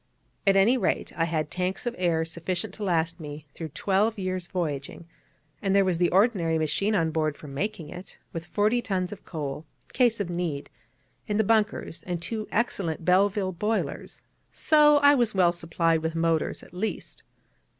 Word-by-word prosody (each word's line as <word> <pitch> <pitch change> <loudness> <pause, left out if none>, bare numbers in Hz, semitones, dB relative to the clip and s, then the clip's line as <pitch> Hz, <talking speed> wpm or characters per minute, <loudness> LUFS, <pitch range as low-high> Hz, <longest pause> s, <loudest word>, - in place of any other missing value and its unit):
At 195 - +6
any 225 +7 +4
rate, 190 - -1
I 165 - +1
had 155 -2 -2
tanks 185 +4 -2
of 240 - -1
air 170 -3 +1
sufficient 170 +2 -3
to 215 - -7
last 165 -3 0
me 150 -1 -8
through 165 - -6
twelve 205 +6 0
years' 185 -2 -3
voyaging; 155 -3 -4 0.6
and 195 -1 +1
there 200 -1 +5
was 180 -3 0
the 175 - +3
ordinary 185 -5 +3
machine 195 +7 0
on 165 -4 +1
board 155 -1 0
for 150 - -11
making 165 +3 -4
it, 180 +4 -10 0.2
with 165 -1 -6
forty 215 +6 +2
tons 185 -3 -2
of 210 - -10
coal, 150 -3 -5 0.3
in - - -22
case 240 -3 +3
of 200 - -1
need, 170 -5 -3 0.6
in 210 - 0
the 220 - +4
bunkers, 215 -5 0
and 175 -2 -2
two 215 +5 -4
excellent 185 -8 -1
Belleville 190 +1 +3
boilers: 210 +5 -3 0.3
so 300 -1 +5
I 285 0 +8
was 240 -6 +1
well 180 -2 +5
supplied 165 -1 0
with 160 0 -2
motors 165 -1 0
at - - -16
least. 205 +5 -4
180 Hz, 180 wpm, -26 LUFS, 165-210 Hz, 0.6 s, I